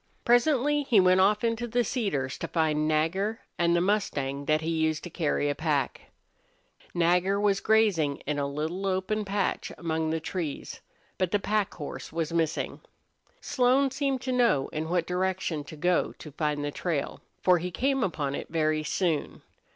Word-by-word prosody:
Presently 280 +4 +3
he 245 -7 +4
went 185 0 +5
off 210 +3 +3
into 230 +1 0
the 240 +1 +1
cedars 170 - -2
to - - -3
find 155 -2 +1
Nagger 180 +8 0 0.2
and 170 0 +3
the 170 - +3
mustang 145 -9 -1
that 155 +1 +2
he 160 +1 -2
used 160 -1 0
to 175 - -7
carry 150 -3 0
a 145 - +1
pack. 145 -3 -2 0.9
Nagger 180 +3 +2
was 200 -1 +2
grazing 195 -10 +2
in 145 0 -1
a 140 - 0
little 160 +7 -3
open 190 +3 0
patch 200 -1 -1
among 160 -2 -1
the 160 0 0
trees, 160 -2 -5 0.4
but 185 -2 +1
the 205 - +2
pack 205 0 -1
horse 145 -4 -7
was 165 0 -2
missing. 160 -2 -1 0.6
Slone 260 +1 +2
seemed 270 -1 -1
to 260 - -2
know 235 - +2
in 155 +1 -4
what 175 -1 +1
direction 180 -3 -1
to 155 - -9
go 175 +3 +1
to 150 - -11
find 150 0 -1
the 145 - -2
trail, 155 -2 -3 0.2
for 180 -1 +5
he 180 +2 -3
came 265 +8 0
upon 150 -7 -1
it - - -5
very 155 -1 +1
soon. 160 0 -1
175 Hz, 175 wpm, -28 LUFS, 155-210 Hz, 0.9 s, went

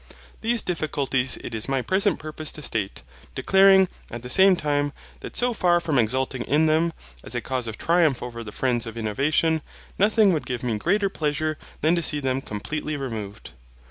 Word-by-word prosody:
These 230 +1 +1
difficulties 140 -7 -1
it - - -6
is 110 +3 -4
my 135 -2 0
present 195 - +1
purpose 155 0 -5
to 150 - -9
state, 105 -7 -3 0.3
declaring, 195 0 +5 0.2
at 120 0 -7
the 125 - -4
same 190 0 +6
time, 145 -2 -1 0.3
that - - -7
so 245 0 +2
far 175 -5 +3
from 155 -6 0
exulting 130 +3 0
in 150 +3 +3
them, 160 +2 +2 0.3
as - - -6
a - - +1
cause 125 0 -3
of 110 - -5
triumph 165 -7 +2
over 115 -1 -6
the 105 - -8
friends 120 0 -1
of 115 0 -7
innovation, 150 +8 +1 0.4
nothing 210 -1 +4
would 155 - -2
give 125 -1 -3
me 115 -4 -1
greater 200 - +2
pleasure 155 -3 -1 0.3
than 155 +3 +3
to 170 - 0
see 150 -2 +1
them 135 -1 -1
completely 150 +8 -4
removed. 110 -7 -6
145 Hz, 185 wpm, -24 LUFS, 125-170 Hz, 0.4 s, same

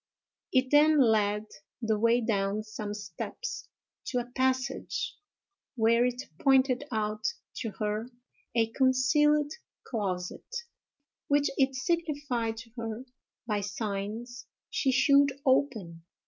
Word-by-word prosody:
It 255 -1 +2
then 300 +1 +6
led 210 -4 +3 0.3
the 220 -3 0
way 230 +2 +4
down 205 -2 0
some 215 -1 -6
steps 210 - -6 0.4
to 250 - -2
a 245 - 0
passage, 260 0 -1 0.6
where 230 0 +4
it 250 +1 -3 0.2
pointed 265 0 +3
out 215 -1 -2 0.3
to 230 - -2
her 215 +2 -2 0.5
a 225 -1 +2
concealed 290 +4 +3 0.3
closet, 195 - -4 0.7
which 285 0 +3
it 270 0 +2
signified 275 -6 -1
to 230 0 -10
her, 230 +2 -4 0.4
by 210 -3 0
signs, 210 +4 -4 0.2
she 270 - +1
should 280 +1 +5
open. 225 -12 +1
240 Hz, 110 wpm, -29 LUFS, 215-265 Hz, 0.7 s, then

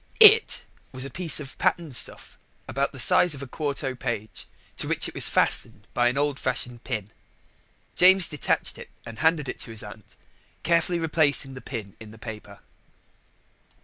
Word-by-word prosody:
It 445 0 +8 0.3
was 130 0 -3
a 135 - -8
piece 170 -1 +3
of 135 -3 -9
patterned 160 -7 -1
stuff - - -2 0.3
about 140 +1 -2
the 130 - -11
size 180 +1 +4
of - - -10
the 140 - -7
quarto 140 0 -3
page, 120 -4 -6 0.3
to - - -3
which - - 0
it - - -9
was - - +3
fastened 100 - -1
by 120 0 +2
an 125 +2 -1
old 145 -1 -1
fashioned 120 -1 -3
pin. 110 -5 -5 0.8
James 185 0 +6
detached 150 - -2
it - - -11 0.2
and 115 -1 -10
handed 160 -3 +1
it - - -6
to - - -5
his 110 -1 -3
aunt, - - -13 0.5
carefully 170 +1 +1
replacing 150 -4 +1
the 130 - -10
pin 110 -7 -8
in 110 -1 -11
the 110 - -14
paper. 110 -2 -10
140 Hz, 175 wpm, -25 LUFS, 120-165 Hz, 0.8 s, It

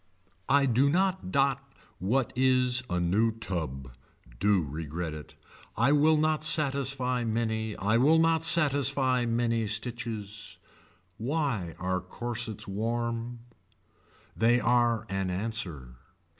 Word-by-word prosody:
I 140 0 +5
do 130 +2 +3
not 185 +3 0
dot 140 -2 +2 0.4
what 120 +6 0
is 130 -1 +3
a 90 - 0
new 100 +7 +2
tub. 80 - -5 0.5
Do 100 -2 +3
regret 80 +2 -5
it. 75 -1 -10 0.4
I 140 - +3
will 155 +2 +4
not 155 0 +1
satisfy 135 -5 0
many 110 -1 -1
I 105 +3 +1
will 150 +7 +5
not 165 0 +3
satisfy 140 -6 +2
many 115 -1 0
stitches. 110 -2 -5 0.6
Why 120 - -2
are 95 0 -1
corsets 110 +3 -5
warm. 115 +3 -3 0.9
They 120 +2 +3
are 120 -2 +2
an 95 0 -2
answer. 90 - -4
115 Hz, 115 wpm, -28 LUFS, 100-135 Hz, 0.9 s, I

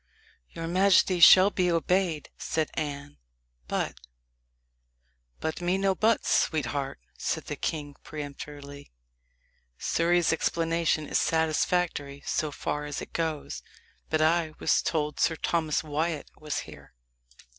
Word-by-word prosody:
"Your 165 - -6
majesty 185 0 +4
shall 185 +4 +9
be 180 -3 +1
obeyed," 170 -1 0
said 160 -1 -2
Anne; 145 - -5 0.5
"but - - -2 0.7
" - - -45
"But 160 +2 -3
me 175 +2 +1
no 195 0 +2
buts, 220 +4 +1
sweetheart," 140 - 0 0.2
said - - -2
the - - -4
king 145 -3 -4
peremptorily. 145 - -8 0.9
"Surrey's 170 0 +2
explanation 165 -1 0
is - - +1
satisfactory 160 -3 0
so 155 - 0
far 150 +1 -3
as 145 -1 -4
it - - -9
goes, 160 -3 -3 0.5
but 155 0 +2
I 160 0 +2
was - - +2
told 150 -2 -1
Sir 165 - +2
Thomas 160 -2 0
Wyat 155 0 -2
was 150 -1 -4
here." - - -13
155 Hz, 125 wpm, -28 LUFS, 145-170 Hz, 0.9 s, shall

